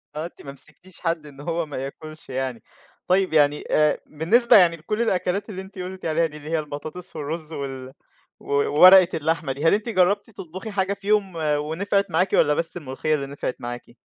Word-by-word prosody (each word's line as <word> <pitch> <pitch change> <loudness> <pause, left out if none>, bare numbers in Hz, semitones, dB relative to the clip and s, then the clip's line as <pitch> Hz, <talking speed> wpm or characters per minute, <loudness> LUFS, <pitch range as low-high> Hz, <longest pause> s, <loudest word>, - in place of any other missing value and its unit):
آه. 155 +2 -3
أنتِ 175 - -11
ما 140 - -8
مسكتيش 150 +6 -16
حد 165 -3 -1
إن 145 -1 -12
هو 170 +1 -2
ما 145 -3 -7
ياكلش 155 +4 -8
يعني. 130 -2 -3 0.4
طيب، 185 -1 +2
يعني 150 -1 +3
آآ 150 0 +3
بالنسبة 215 +12 +4
يعني 175 -3 +5
لكل 210 +8 -3
الأكلات 195 -1 -1
اللي 190 -2 -6
أنتِ 190 0 -12
قُلتِ 185 0 -7
عليها 165 +1 +2
دي، 150 -2 -6
اللي 150 +1 -10
هي 165 -1 +1
البطاطس 155 +4 -8
والرُز 155 +2 -5
وال 135 -2 -6 0.5
و - - -19
وورقة 180 +6 +7
اللحمة 160 -2 -1
دي، 140 +4 -4
هل 165 - +5
أنتِ 215 +3 -1
جرّبتي 200 +2 +1
تطبُخي 185 +4 -8
حاجة 195 -1 0
فيهم 200 -1 0
ونفعت 160 +6 0
معاكِ 185 +4 +1
والّا 150 - +4
بس 165 +3 -2
الملوخية 150 +1 -2
اللي 140 -2 -3
نفعت 140 -2 -4
معاكِ؟ 120 0 -7
165 Hz, 190 wpm, -23 LUFS, 145-185 Hz, 0.5 s, وورقة